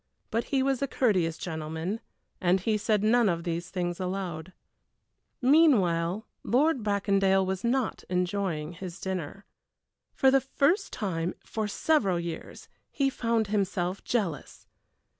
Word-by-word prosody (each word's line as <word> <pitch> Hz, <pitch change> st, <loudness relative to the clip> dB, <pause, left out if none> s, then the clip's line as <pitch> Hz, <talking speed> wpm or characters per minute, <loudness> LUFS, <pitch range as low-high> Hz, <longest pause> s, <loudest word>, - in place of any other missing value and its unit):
But 230 Hz, +1 st, 0 dB
he 270 Hz, -2 st, +1 dB
was 270 Hz, -1 st, 0 dB
a 275 Hz, -, +1 dB
courteous 185 Hz, -12 st, +1 dB
gentleman 160 Hz, +4 st, -4 dB, 0.4 s
and 180 Hz, +1 st, +3 dB
he 215 Hz, +3 st, +1 dB
said 210 Hz, 0 st, +1 dB
none 230 Hz, 0 st, +4 dB
of 170 Hz, -1 st, -1 dB
these 170 Hz, 0 st, -3 dB
things 175 Hz, -1 st, -3 dB
aloud. 185 Hz, -2 st, -4 dB, 0.9 s
Meanwhile, 215 Hz, -, +4 dB, 0.2 s
Lord 275 Hz, +2 st, +2 dB
Bracondale 195 Hz, -2 st, +2 dB
was 190 Hz, 0 st, -3 dB
not 245 Hz, +1 st, 0 dB
enjoying 180 Hz, -3 st, -1 dB
his 180 Hz, +1 st, -8 dB
dinner. 190 Hz, 0 st, -5 dB, 0.7 s
For 265 Hz, -, +5 dB
the 270 Hz, 0 st, +4 dB
first 300 Hz, +9 st, +1 dB
time 175 Hz, -4 st, -2 dB
for 220 Hz, -1 st, -2 dB
several 205 Hz, -, +1 dB
years 170 Hz, -1 st, -7 dB, 0.2 s
he 275 Hz, -1 st, 0 dB
found 230 Hz, -3 st, 0 dB
himself 195 Hz, -2 st, -1 dB
jealous! 200 Hz, -11 st, -3 dB
195 Hz, 130 wpm, -28 LUFS, 175-235 Hz, 0.9 s, For